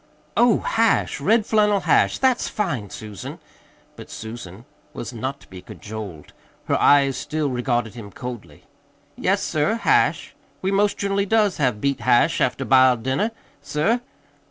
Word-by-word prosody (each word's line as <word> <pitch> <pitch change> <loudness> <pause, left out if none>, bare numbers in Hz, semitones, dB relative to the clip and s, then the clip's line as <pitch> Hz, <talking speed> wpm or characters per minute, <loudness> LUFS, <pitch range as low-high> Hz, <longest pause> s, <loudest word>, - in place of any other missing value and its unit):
"Oh, 235 -1 +4
hash 225 -8 +1
red 215 +8 +3
flannel 210 -2 +2
hash! 170 -3 +3
That's 260 -2 +1
fine, 140 - -3
Susan!" 105 -1 -8 0.6
But - - -11
Susan 110 -1 -9 0.3
was 120 - -6
not 130 +4 -4
to - - -18
be 95 -1 -11
cajoled. 105 -9 -9 0.3
Her - - 0
eyes 140 -2 +5
still 150 0 -2
regarded 120 -3 -1
him 115 -4 -9
coldly. 115 - -9 0.5
"Yes, - - 0
sir, 155 +9 0
hash. 230 - +1 0.3
We 190 - -1
most 200 +1 +2
generally 200 0 -1
does 210 -3 +2
have 125 -7 0
beet 140 -1 0
hash 120 +1 +3
after - - 0
b'iled 130 -3 +4
dinner, 135 - 0 0.3
sir. 220 +12 0
135 Hz, 145 wpm, -22 LUFS, -, 0.6 s, eyes